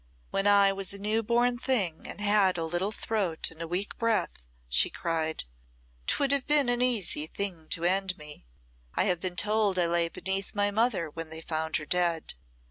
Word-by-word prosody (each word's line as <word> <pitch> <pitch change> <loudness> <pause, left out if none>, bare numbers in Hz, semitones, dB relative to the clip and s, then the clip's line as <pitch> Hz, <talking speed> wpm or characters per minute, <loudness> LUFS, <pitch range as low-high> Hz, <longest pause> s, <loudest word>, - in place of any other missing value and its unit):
"When 195 +1 +1
I 200 -1 +6
was 195 -1 -2
a - - -3
new 215 +3 0
born 240 +2 +1
thing 205 -12 0
and - - -6
had 205 -3 +3
a 165 - -2
little 175 +5 -1
throat 200 -9 -1
and 165 0 -11
a 165 - -4
weak 180 +4 -3
breath," 225 - -1 0.2
she - - +3
cried, 160 -2 -2 0.6
"'twould 275 -1 +2
have 280 -2 +1
been 295 -4 +4
an 245 0 +1
easy 205 -11 +2
thing 175 -4 -4
to 170 - -1
end 185 +1 +1
me. 150 - -11 0.5
I - - +3
have 180 -2 +1
been 180 0 -3
told 210 0 +2
I 175 - +3
lay 170 0 +1
beneath 190 +3 -2
my 205 0 +2
mother 210 -7 0
when 165 +1 -5
they 160 0 -7
found 160 -1 -2
her 155 - -7
dead. 170 0 0
190 Hz, 195 wpm, -28 LUFS, 165-210 Hz, 0.6 s, I